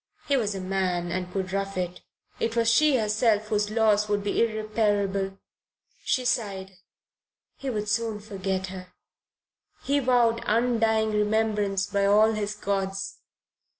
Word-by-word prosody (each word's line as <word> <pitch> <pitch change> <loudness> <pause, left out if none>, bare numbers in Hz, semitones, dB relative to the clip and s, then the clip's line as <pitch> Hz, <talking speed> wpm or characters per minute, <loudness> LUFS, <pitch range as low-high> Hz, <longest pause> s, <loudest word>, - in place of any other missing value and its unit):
He 280 - +2
was 210 -6 0
a - - -4
man 185 -2 -1
and 180 0 -3
could 190 0 -3
rough 195 0 -2
it. 180 -1 -3 0.4
It 230 0 -1
was 230 -1 +3
she 300 0 +4
herself 215 -1 +1
whose 210 -1 +1
loss 215 -1 +2
would 205 -1 0
be 205 - 0
irreparable. 205 -3 0 0.7
She 255 -2 0
sighed; 200 -7 -1 0.8
he 275 - -5
would 210 -3 -3
soon 220 0 -1
forget 195 -2 -3
her. 180 -1 -10 0.9
He 285 +1 +1
vowed 240 -3 +2
undying 225 -1 +2
remembrance 210 -2 +1
by 200 -1 0
all 215 +2 +5
his 210 -1 -3
gods. 195 -1 -3
210 Hz, 140 wpm, -26 LUFS, 195-225 Hz, 0.9 s, all